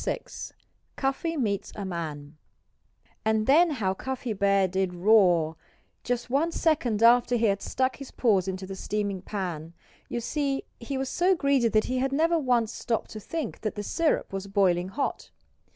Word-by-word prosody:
VI - - -1 0.7
CUFFY 290 +5 -1
MEETS 205 -7 -1
A 205 - -5
MAN 155 -5 -5 0.9
And 220 0 +1
then 325 +7 +5
how 215 -11 -1
Cuffy 255 +2 -4
Bear 200 -1 +3
did 190 0 -1
roar 175 -5 +4 0.5
just 245 -1 -2
one 285 +7 +1
second 255 -11 +1
after 245 +1 +5
he 230 -1 +2
had 200 -2 +1
stuck 260 -1 -1
his 275 -2 -9
paws 200 -6 +2
into 190 0 -4
the 195 0 -7
steaming 200 -1 -2
pan. 175 -5 -5 0.4
You 240 - -2
see 275 +2 -1 0.2
he 265 +3 -4
was 265 0 -2
so 360 +7 +2
greedy 280 -6 +2
that 215 -1 +2
he 255 0 -1
had 270 +1 0
never 330 +3 +3
once 240 -5 +1
stopped 230 -2 -2
to 215 - -6
think 300 +3 -5
that 215 - -3
the 205 - -4
syrup 315 -1 0
was 195 0 -4
boiling 185 -3 +2
hot. 275 +8 -3
220 Hz, 170 wpm, -27 LUFS, 195-270 Hz, 0.9 s, then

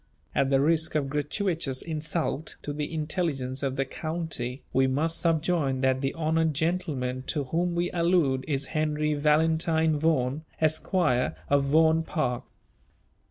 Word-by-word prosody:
At 135 - +2
the 135 -1 +3
risk 160 +2 +2
of 140 -3 0
gratuitous 150 -2 -1
insult 160 -1 -3
to 145 - -4
the 150 +1 -3
intelligence 150 -5 -2
of 135 -2 -1
the 135 0 0
county, 155 -4 -4
we 130 0 +4
must 155 +5 0
subjoin 160 -5 +1
that 130 0 +2
the 135 0 -1
honoured 160 -1 +1
gentleman 145 -6 -1
to 145 - -1
whom 170 +6 -1
we 175 +1 0
allude 170 -7 +2
is 140 -2 -1
Henry 150 -1 0
Valentine 160 +1 +2
Vaughan, 145 -2 +1 0.2
Esquire, 155 -4 +1 0.2
of 140 -1 +4
Vaughan 160 +3 +4
Park. 155 -7 -2
155 Hz, 140 wpm, -27 LUFS, 135-165 Hz, 0.2 s, we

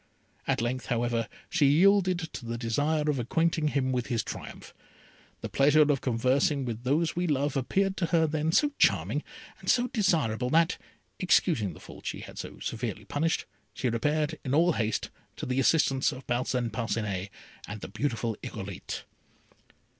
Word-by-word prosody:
At - - +1
length, 125 -1 -2
however, 120 -1 0 0.2
she 150 -4 +3
yielded 185 +4 +5 0.2
to - - -6
the 115 0 -4
desire 145 +7 0
of 145 -3 +1
acquainting 160 +5 +1
him 135 -3 0
with 125 -2 -1
his 115 -4 0
triumph. - - -8 0.7
The - - -3
pleasure 150 +3 +5
of 140 - 0
conversing 130 +3 +1
with 120 -1 -4
those 155 +6 +1
we 175 +1 0
love 145 -1 0
appeared 190 +9 +1
to 170 - 0
her 165 -1 +3
then 155 +1 0
so 290 - +3
charming - - +3 0.4
and - - -5
so 245 -1 +4
desirable, 140 - +1
that, 165 +4 +3 0.4
excusing 155 - +2
the - - -13
fault - - -11
she - - -4
had - - -9
so - - -7
severely 110 -3 -4
punished, 160 +8 0 0.3
she 130 - 0
repaired, 150 +6 0
in 135 0 0
all 170 +3 +5
haste, 110 -7 -1 0.2
to - - -5
the 130 +1 0
assistance 135 -1 +3
of 130 -1 -9
Parcin 120 -1 -1
Parcinet 105 -4 -2 0.4
and 105 +1 -7
the - - -5
beautiful 115 -5 -2
Irolite. 100 -3 -6
135 Hz, 165 wpm, -28 LUFS, 115-160 Hz, 0.7 s, yielded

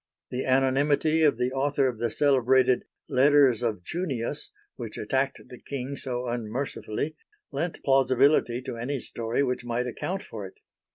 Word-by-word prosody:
The 125 +1 -2
anonymity 140 +4 +2
of 150 -7 +4
the 125 +1 0
author 140 0 +1
of 120 -4 -3
the 120 0 0
celebrated 130 -1 +3 0.2
"Letters 135 -3 +4
of 110 -7 -2
Junius," 135 - -3 0.3
which - - -7
attacked - - -1
the - - -11
King 140 0 -5
so 125 -2 -3
unmercifully, 120 +4 -3 0.4
lent 170 -1 -3
plausibility 135 -2 +3
to 120 - -5
any 130 +4 -2
story 115 +3 -2
which 125 -2 -1
might 120 +1 -1
account 180 +10 -4
for 105 -3 -7
it. - - -16
130 Hz, 150 wpm, -27 LUFS, 120-140 Hz, 0.4 s, of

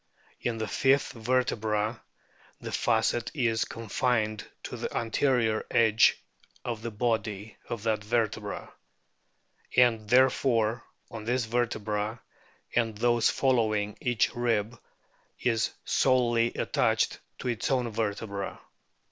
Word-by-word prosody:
In 120 -2 -2
the 110 -1 -2
fifth 135 +5 +2
vertebra 110 -2 0 0.6
the - - -6
facet 120 -1 +1
is 115 -5 +1
confined 115 -1 -1 0.2
to - - -6
the - - -4
anterior 115 -1 +1
edge 110 -1 +4 0.5
of 115 -3 -3
the 115 - -3
body 110 -2 -2
of 115 -3 -4
that 110 -2 0
vertebra; 110 -2 -2 1.0
and 115 -4 +4
therefore 125 -2 +3 0.3
on 110 -2 -7
this 120 +1 0
vertebra 110 -2 -1 0.6
and 115 -3 +1
those 120 0 +3
following 110 -6 +1
each 120 -7 +1
rib 115 -1 0 0.6
is 115 -3 +1 0.2
solely 120 -3 +3
attached - - +1 0.2
to 125 - -3
its 120 -3 -1
own 125 -3 +1
vertebra. 100 -2 -3
115 Hz, 110 wpm, -28 LUFS, 110-120 Hz, 1.0 s, edge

